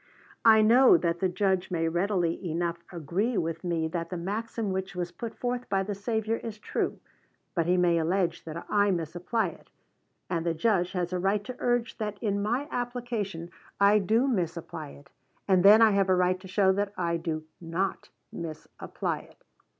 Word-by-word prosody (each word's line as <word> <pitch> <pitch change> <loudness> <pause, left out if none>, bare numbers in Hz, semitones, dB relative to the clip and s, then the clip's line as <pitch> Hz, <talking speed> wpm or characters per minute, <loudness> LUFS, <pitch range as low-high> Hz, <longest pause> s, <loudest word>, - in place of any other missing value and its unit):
I 220 -1 +7
know 245 +4 +7
that 170 -1 -1
the 190 - +1
Judge 190 0 0
may 165 -3 0
readily 175 0 0
enough 170 +1 -1
agree 180 - -1
with 165 0 -2
me 170 -2 0
that 170 0 -3
the 180 - -4
maxim 210 +4 -3
which 190 -1 -3
was 175 -1 -3
put 225 +6 -7
forth 245 0 -3
by 195 -1 +1
the 205 +2 -3
Savior 220 +2 -1
is 225 -2 -7
true, - - -2 0.5
but 170 -2 0
he 180 +1 +3
may 175 -2 +3
allege 170 +1 0
that 165 +1 -6
I 205 -1 +3
misapply 175 +4 -1
it; 160 - -16 0.6
and 170 -2 -1
the 170 -1 0
Judge 180 0 +1
has 180 -1 -2
a 180 - 0
right 195 +3 +1
to 250 +4 -7
urge 245 0 0
that 210 -2 -3
in 200 -2 -1
my 240 +8 -1
application 235 -8 -3 0.3
I 200 +1 +6
do 225 +7 +2
misapply 170 - -3
it, 140 0 -15 0.4
and 185 -2 +4
then 210 +3 +8
I 220 - +6
have 195 -1 +2
a 185 - +5
right 180 0 +2
to 190 - -11
show 190 0 +3
that 200 +1 -1
I 170 -1 0
do 160 -2 -3 0.2
not 175 +3 -3 0.2
misapply 160 -2 -5
it. - - -22
190 Hz, 185 wpm, -28 LUFS, 170-215 Hz, 0.6 s, then